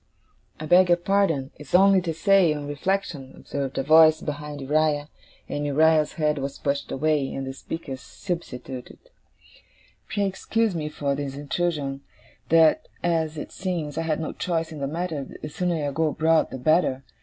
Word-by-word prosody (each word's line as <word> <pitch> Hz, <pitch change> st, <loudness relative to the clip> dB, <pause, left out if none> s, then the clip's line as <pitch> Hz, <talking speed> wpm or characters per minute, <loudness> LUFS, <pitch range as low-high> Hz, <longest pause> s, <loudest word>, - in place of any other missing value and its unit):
'I 155 Hz, -, -5 dB
beg 180 Hz, +3 st, +6 dB
your 175 Hz, -, +5 dB
pardon. 175 Hz, -7 st, +1 dB
It's 150 Hz, +2 st, -3 dB
only 195 Hz, 0 st, +6 dB
to 170 Hz, -2 st, -2 dB
say, 180 Hz, -1 st, +3 dB
on 145 Hz, -1 st, -5 dB
reflection,' 145 Hz, -3 st, -3 dB
observed 140 Hz, -2 st, -5 dB
a -, -, +1 dB
voice 155 Hz, +2 st, +6 dB
behind 150 Hz, 0 st, -5 dB
Uriah, 150 Hz, +1 st, +1 dB, 0.4 s
as -, -, -3 dB
Uriah's 155 Hz, +1 st, +3 dB
head 150 Hz, -2 st, 0 dB
was 140 Hz, 0 st, -4 dB
pushed 140 Hz, 0 st, -2 dB
away, 145 Hz, -1 st, 0 dB
and 135 Hz, -, -4 dB
the 135 Hz, -, -5 dB
speaker's 135 Hz, -2 st, -7 dB
substituted 135 Hz, -8 st, -6 dB, 1.1 s
'pray 205 Hz, -1 st, -1 dB
excuse 210 Hz, +3 st, 0 dB
me 155 Hz, -3 st, -3 dB
for 145 Hz, -2 st, -2 dB
this 140 Hz, -1 st, -4 dB
intrusion 145 Hz, -1 st, -2 dB, 0.5 s
that 165 Hz, -, +4 dB, 0.2 s
as 160 Hz, -2 st, 0 dB
it -, -, -6 dB
seems 170 Hz, -6 st, -3 dB
I 165 Hz, -, -1 dB
have 160 Hz, -1 st, -1 dB
no 160 Hz, -, -4 dB
choice 165 Hz, -2 st, -2 dB
in 155 Hz, -, -7 dB
the 140 Hz, -, -2 dB
matter, 160 Hz, -1 st, -3 dB, 0.2 s
the 150 Hz, -, -6 dB
sooner 165 Hz, -2 st, -1 dB
I -, -, -2 dB
go 160 Hz, +3 st, +1 dB
abroad 160 Hz, +1 st, +2 dB
the -, -, -6 dB
better. 135 Hz, -1 st, +2 dB
155 Hz, 170 wpm, -25 LUFS, 140-170 Hz, 1.1 s, beg